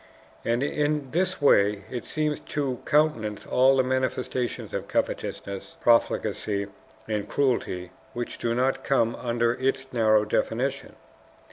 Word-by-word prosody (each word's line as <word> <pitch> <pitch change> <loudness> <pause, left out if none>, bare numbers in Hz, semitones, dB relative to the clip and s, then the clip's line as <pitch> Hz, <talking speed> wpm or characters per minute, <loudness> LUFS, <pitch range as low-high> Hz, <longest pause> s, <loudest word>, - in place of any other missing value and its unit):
And 120 +3 +1
in 145 -2 -1
this 185 +2 0
way 105 -8 +4
it 125 -2 -4
seems 150 -1 -1
to 135 -4 -3
countenance 145 -9 +1
all 130 +1 +4
the 130 - +4
manifestations 130 -1 -2
of - - -3
covetousness, 100 +11 -3
profligacy, 110 -5 +2 0.4
and 105 -2 -2
cruelty 105 -10 0 0.2
which 120 0 -5
do 115 0 0
not 130 +2 +1
come 120 -4 +2
under 120 -1 0
its 135 +1 -2
narrow 110 -2 +4
definition. 120 +5 -1
125 Hz, 125 wpm, -26 LUFS, 115-135 Hz, 0.4 s, way